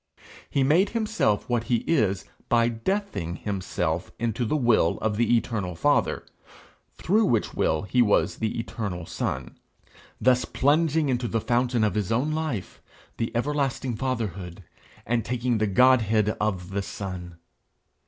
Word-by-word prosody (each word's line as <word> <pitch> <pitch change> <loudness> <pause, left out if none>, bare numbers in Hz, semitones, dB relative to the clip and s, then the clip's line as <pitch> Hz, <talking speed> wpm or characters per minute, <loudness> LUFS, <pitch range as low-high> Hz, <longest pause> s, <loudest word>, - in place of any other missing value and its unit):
He 140 - +1
made 170 +9 +4
himself 215 - 0
what 120 -1 0
he 120 -2 0
is 105 - +1 0.2
by 115 0 +4
deathing 115 - -2
himself 90 -4 -3
into 115 +1 -1
the 115 - 0
will 120 - +3
of 110 -1 -1
the 120 +2 +3
eternal 105 -7 -3
Father, - - +1 0.7
through 210 +6 +2
which 115 - +1
will 80 +3 +1
he 125 +5 +2
was 105 -4 +2
the 110 -1 -2
eternal 100 -7 -4
Son 65 -5 -4 0.6
thus 125 0 +3
plunging 155 +2 +2
into 125 -1 0
the 115 - 0
fountain 120 0 +1
of 105 - +2
his 105 -2 -1
own 130 +7 +1
life, 155 - -3 0.4
the 115 - -2
everlasting 135 -1 -1
Fatherhood, 100 -8 -4 0.4
and 115 0 0
taking 120 -1 -1
the 110 - +1
Godhead 110 -1 +4
of 95 -4 -2
the 100 +1 -1
Son. 90 -3 -6
115 Hz, 145 wpm, -26 LUFS, 100-130 Hz, 0.7 s, made